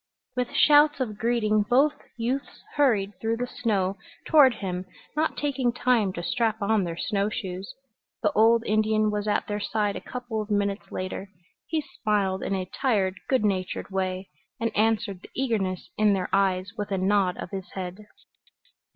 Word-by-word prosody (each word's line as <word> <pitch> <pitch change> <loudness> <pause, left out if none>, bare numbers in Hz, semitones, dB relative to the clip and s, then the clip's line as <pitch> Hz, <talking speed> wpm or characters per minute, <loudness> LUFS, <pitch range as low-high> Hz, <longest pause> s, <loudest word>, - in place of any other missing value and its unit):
With 250 -1 -1
shouts 295 0 +6
of 215 -5 -3
greeting 220 -2 +2
both 265 +8 +3 0.2
youths 250 +4 -3
hurried 225 -9 +2
through 225 +1 0
the 245 - -1
snow 200 -6 -1 0.3
toward 275 -6 +6
him, 185 -3 -4 0.3
not 315 +1 0
taking 270 -4 0
time 240 -5 +2
to 170 - -5
strap 220 +4 0
on 205 -1 +2
their 170 -1 -4
snow 200 +2 0
shoes. 190 -2 -5 0.5
The 210 - +3
old 225 +1 +4
Indian 215 0 +2
was 210 0 -2
at 210 - +1
their 205 0 -3
side 205 0 -1
a - - -5
couple 245 -3 -4
of 210 - -7
minutes 200 -1 -1
later. 185 +1 -4 0.4
He 320 -1 0 0.2
smiled 200 -4 +1
in 195 - -1
a 185 -1 -2
tired 195 -4 0
good 260 -5 +3
natured 190 0 -1
way, 185 0 -2 0.3
and 230 0 -1
answered 215 -3 +1
the - - -13
eagerness 210 -8 -1
in 210 -1 +5
their 185 -2 -1
eyes 190 -1 +2
with 210 -2 -4
a 195 - 0
nod 190 -1 +2
of - - -7
his 190 -2 -6
head. 190 +2 -6
210 Hz, 170 wpm, -26 LUFS, 195-235 Hz, 0.5 s, shouts